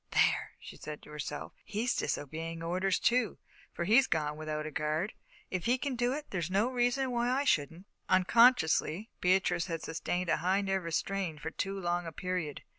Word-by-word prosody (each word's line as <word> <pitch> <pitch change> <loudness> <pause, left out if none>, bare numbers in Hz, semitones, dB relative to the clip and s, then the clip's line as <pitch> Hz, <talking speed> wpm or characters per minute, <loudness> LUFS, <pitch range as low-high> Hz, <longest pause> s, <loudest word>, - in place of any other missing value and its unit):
"There," - - +2
she - - -11
said 150 -1 -8
to - - -13
herself, 150 0 -5
"he's 220 +4 -1
disobeying 165 +3 -3
orders, 185 +3 +1
too, 235 -4 +2 0.3
for - - -3
he's 240 +9 +5
gone 150 -2 0
without 155 0 -4
a 155 - -5
guard. 155 +6 -1 0.4
If 185 -2 -2
he 245 +2 +3
can 270 0 -2
do 245 +1 +1
it, 295 +2 -5
there's 175 -4 -2
no 205 +7 +2
reason 250 +1 +1
why 240 0 +1
I 265 +3 +2
shouldn't." 165 - 0 0.2
Unconsciously, 190 -2 +4
Beatrice 180 -1 +2
had 165 -2 -4
sustained 175 +2 -2
a - - +3
high 190 +3 +1
nervous 190 -4 0
strain 195 -5 -2
for 160 +2 -5
too 195 +2 -3
long 175 -1 -1
a - - -5
period. 180 -3 -3
185 Hz, 185 wpm, -31 LUFS, 160-230 Hz, 0.4 s, he's